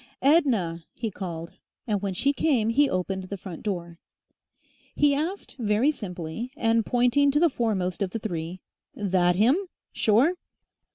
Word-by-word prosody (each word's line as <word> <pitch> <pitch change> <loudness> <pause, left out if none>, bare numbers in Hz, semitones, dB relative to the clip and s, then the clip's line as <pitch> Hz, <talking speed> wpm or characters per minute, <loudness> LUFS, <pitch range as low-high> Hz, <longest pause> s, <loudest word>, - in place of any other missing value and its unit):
"Edna!" 235 - +3
he 225 -3 -3
called, 170 -4 -6 0.3
and 210 -4 -1
when 195 -2 -2
she 280 +9 +2
came 260 -7 +1
he 280 +5 +3
opened 185 +1 -2
the 200 +2 -6
front 180 -2 -8
door. 175 -5 -4 1.0
He 290 -1 +4
asked 330 +8 -3
very 220 +5 +2
simply, 190 - -6
and 225 -2 +2
pointing 250 +5 +3
to 285 +1 +2
the 335 -1 +4
foremost 200 -8 -1
of 195 - 0
the 205 - -4
three, 180 -4 -5 0.3
"That 185 -5 +2
'im?... 265 - +3 0.3
Sure?"... 235 - +3
215 Hz, 150 wpm, -26 LUFS, 180-270 Hz, 1.0 s, He